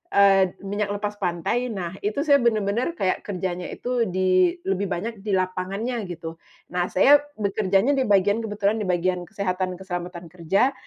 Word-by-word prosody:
eee, 195 -2 +5
minyak 205 +1 -2
lepas 205 0 -4
pantai. 185 +7 -1
Nah, 185 -7 -4
itu 210 +6 -2
saya 285 -3 +5
bener-bener 235 - +1
kayak 185 - -1
kerjanya 180 -2 -3
itu 245 -2 -1
di 185 -1 +2
lebih 195 +1 -1
banyak 215 +5 -4
di 205 +1 -4
lapangannya 195 +5 -2
gitu. 165 -1 -7 0.3
Nah, 180 0 0
saya 285 +10 +6 0.2
bekerjanya 200 +3 +1
di 265 -4 +1
bagian 205 +2 +3
kebetulan 210 -1 -1
di 205 - -3
bagian 180 0 0
kesehatan 185 -3 -2
keselamatan 175 -2 -6
kerja. 190 +9 +1
195 Hz, 155 wpm, -24 LUFS, 180-215 Hz, 0.3 s, saya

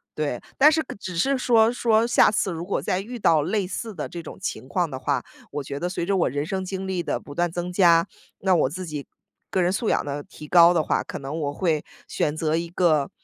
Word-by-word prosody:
对。 145 -5 -2 0.2
但 295 +3 +7
是 320 +1 +2 0.2
只 180 -4 -6
是 270 +9 +2
说 230 -3 +4
说 230 -2 +2
下 240 - +5
次 200 -2 0
如 165 0 -5
果 195 - -1
再 185 - -1
遇 240 +4 -7
到 160 -7 +4
类 190 +5 -1
似 220 +3 -5
的 150 - -4
这 170 - -6
种 - - -9
情 130 -8 -4
况 175 0 0
的 130 - -5
话， 135 -2 -1 0.3
我 145 0 -3
觉 140 +1 -5
得 175 - -2
随 175 -2 -3
着 195 - +1
我 175 - +2
人 145 +3 -2
生 190 +3 -3
经 190 0 -4
历 185 -2 -2
的 - - -2
不 145 - -11
断 175 -1 0
增 175 +1 -4
加， 170 -3 +5 0.3
那 190 -2 +3
我 150 - +2
自 185 +6 -6
己 150 -4 -6 0.4
个 185 - +1
人 175 - +2
素 220 +2 -1
养 - - +1
的 145 0 -4
提 150 - -12
高 170 +2 +7
的 165 - +3
话， - - 0
可 - - -7
能 140 +3 -5
我 145 -1 -2
会 155 -2 0 0.2
选 150 - -1
择 155 0 0
一 170 0 -2
个 165 -5 +2
175 Hz, 265 characters per minute, -24 LUFS, 150-190 Hz, 0.4 s, 但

